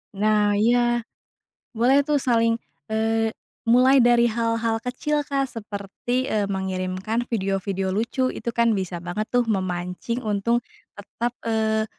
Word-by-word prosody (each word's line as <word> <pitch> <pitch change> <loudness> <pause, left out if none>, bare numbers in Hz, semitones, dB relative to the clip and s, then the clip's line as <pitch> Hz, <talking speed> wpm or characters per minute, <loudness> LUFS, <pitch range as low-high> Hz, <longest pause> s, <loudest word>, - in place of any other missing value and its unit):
Nah 210 0 +2
iya, 240 +2 +2 0.7
boleh 260 +5 +5
tuh 295 +1 +1
saling, 230 -3 +2 0.3
eee, 225 0 +1 0.4
mulai 255 +3 +6
dari 240 0 +5
hal-hal 230 -1 0
kecil, 295 +5 -1
Kak, 280 -1 -1
seperti, 225 +2 -4
eee, 210 -5 -1
mengirimkan 190 +3 -2
video-video 195 -2 -1
lucu 250 +5 0
itu - - -4
kan 235 -1 +2
bisa 185 -3 -3
banget 175 +5 -4
tuh 245 -1 +2
memancing 185 +1 -2
untung 215 +3 +1 0.4
tetap, 235 +4 -4
eee, 220 -1 +1
225 Hz, 125 wpm, -24 LUFS, 200-240 Hz, 0.7 s, mulai